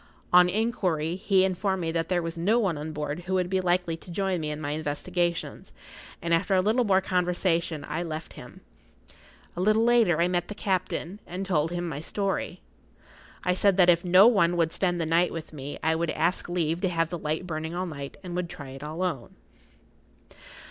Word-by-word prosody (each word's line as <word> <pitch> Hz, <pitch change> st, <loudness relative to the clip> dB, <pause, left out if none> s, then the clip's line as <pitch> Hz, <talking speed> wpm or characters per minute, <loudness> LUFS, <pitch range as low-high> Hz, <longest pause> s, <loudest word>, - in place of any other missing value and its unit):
On 180 Hz, 0 st, +7 dB
inquiry, 180 Hz, -6 st, 0 dB
he 190 Hz, 0 st, +3 dB
informed 190 Hz, 0 st, -1 dB
me 165 Hz, -1 st, -1 dB
that 165 Hz, 0 st, -2 dB
there 175 Hz, -2 st, +1 dB
was 165 Hz, 0 st, -4 dB
no 190 Hz, +8 st, +2 dB
one 195 Hz, -8 st, +1 dB
on 150 Hz, +2 st, -5 dB
board 150 Hz, +3 st, -4 dB
who 190 Hz, -, 0 dB
would 180 Hz, -1 st, 0 dB
be 190 Hz, -1 st, +2 dB
likely 175 Hz, -2 st, +1 dB
to 170 Hz, -, -15 dB
join 190 Hz, 0 st, -1 dB
me 155 Hz, -, -3 dB
in 150 Hz, 0 st, -4 dB
my 145 Hz, -1 st, -3 dB
investigations, 170 Hz, +3 st, -2 dB, 0.5 s
and 170 Hz, 0 st, 0 dB
after 180 Hz, +4 st, +2 dB
a 185 Hz, -, +4 dB
little 220 Hz, +6 st, +2 dB
more 195 Hz, -3 st, +3 dB
conversation 175 Hz, -4 st, 0 dB
I 170 Hz, -, -3 dB
left 160 Hz, -2 st, -5 dB
him. -, -, -12 dB, 0.9 s
A 175 Hz, -, -3 dB
little 215 Hz, +3 st, +3 dB
later 230 Hz, -9 st, +4 dB
I 170 Hz, -, +3 dB
met 175 Hz, -1 st, -1 dB
the 210 Hz, -, -7 dB
captain, 185 Hz, -1 st, -2 dB
and 185 Hz, +2 st, -4 dB
told 165 Hz, -4 st, +1 dB
him 175 Hz, 0 st, -3 dB
my 145 Hz, -3 st, -4 dB
story. 195 Hz, +3 st, -2 dB, 0.8 s
I 180 Hz, -, +2 dB
said 195 Hz, +1 st, +2 dB
that 180 Hz, -2 st, +7 dB
if 170 Hz, 0 st, +1 dB
no 185 Hz, +2 st, +7 dB
one 195 Hz, -7 st, +4 dB
would 165 Hz, -1 st, +2 dB
spend 175 Hz, -1 st, 0 dB
the 165 Hz, -, 0 dB
night 170 Hz, +2 st, +2 dB
with 160 Hz, -1 st, -7 dB
me 145 Hz, -1 st, -6 dB
I 160 Hz, -, +3 dB
would 165 Hz, 0 st, -1 dB
ask 170 Hz, +4 st, 0 dB
leave 170 Hz, -1 st, -1 dB
to 190 Hz, -, +1 dB
have 165 Hz, -1 st, 0 dB
the 175 Hz, -, -3 dB
light[Pg 150 Hz, 0 st, -1 dB
53] -, -, -10 dB
burning 160 Hz, -1 st, -4 dB
all 180 Hz, +1 st, -2 dB
night, 140 Hz, -5 st, -7 dB
and 175 Hz, -1 st, -6 dB
would 180 Hz, -1 st, -2 dB
try 140 Hz, -5 st, -9 dB
it 135 Hz, 0 st, -10 dB
alone. 155 Hz, -4 st, -4 dB
175 Hz, 210 wpm, -27 LUFS, 160-185 Hz, 0.9 s, On